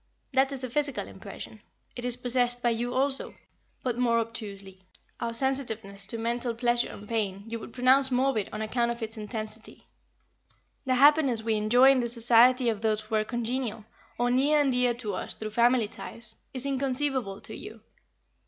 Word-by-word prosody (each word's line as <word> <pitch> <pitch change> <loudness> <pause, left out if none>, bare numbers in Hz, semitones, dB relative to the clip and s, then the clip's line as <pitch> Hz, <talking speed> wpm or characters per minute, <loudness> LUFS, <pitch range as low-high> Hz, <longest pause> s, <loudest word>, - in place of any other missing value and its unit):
That 265 +1 +3
is 270 -2 -4
a 255 - -3
physical 285 -1 -1
impression. - - -10 0.3
It 245 - -6
is 245 -1 +1
possessed 245 0 +1
by 240 - +3
you 240 +2 -2
also, 270 +2 -1 0.5
but 245 -2 -1
more 235 -2 +3
obtusely. 200 -5 -5 0.4
"Our 230 - -2
sensitiveness 225 -6 -2
to 230 - -4
mental 235 +1 -2
pleasure 240 0 +1
and 210 - -10
pain 200 -4 -2
you 230 0 -5
would 225 - -9
pronounce 260 +2 +4
morbid 255 -4 +1
on 215 - -4
account 235 +2 0
of 235 0 -4
its 220 +1 -5
intensity. 215 0 -7 1.0
The 255 - +3
happiness 275 -4 +5
we 225 0 +1
enjoy 240 +5 +5
in 270 - +3
the 240 -1 -1
society 240 +2 +5
of 220 -3 0
those 215 -1 +1
who 215 +1 -11
are 215 -1 +3
congenial, 235 -1 -3 0.3
or 245 0 +1
near 285 +4 +3
and 280 -2 +3
dear 250 -1 +2
to 230 -4 -4
us - - -5
through 215 -1 -6
family 235 0 +3
ties, 230 +1 -7 0.2
is 260 0 -4
inconceivable 265 -5 -1
to - - -8
you. - - -10
240 Hz, 180 wpm, -28 LUFS, 220-255 Hz, 1.0 s, happiness